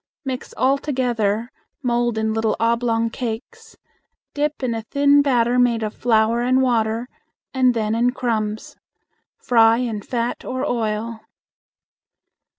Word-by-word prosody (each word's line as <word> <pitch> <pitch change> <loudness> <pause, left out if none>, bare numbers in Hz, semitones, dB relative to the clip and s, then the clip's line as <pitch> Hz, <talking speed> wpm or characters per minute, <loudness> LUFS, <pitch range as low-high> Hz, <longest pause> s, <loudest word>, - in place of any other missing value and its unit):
Mix 260 -1 -5
all 270 +2 +2
together, 240 -5 -1 0.3
mold 240 -2 0
in 220 0 0
little 220 0 0
oblong 230 0 +1
cakes, 250 - -6 0.6
dip 295 -1 -2
in 245 -2 0
a 225 - -3
thin 285 +5 +3
batter 245 -3 +2
made 235 -2 +2
of 215 0 -3
flour 230 0 +2
and 255 +2 +2
water, 230 -1 0 0.5
and 255 -2 +3
then 215 -1 0
in 235 +2 +2
crumbs. 215 -4 -3 0.6
Fry 225 -2 +4
in 230 -4 -2
fat 235 +2 -3
or 255 0 -3
oil. 225 -1 -2
235 Hz, 130 wpm, -21 LUFS, 225-255 Hz, 0.6 s, Fry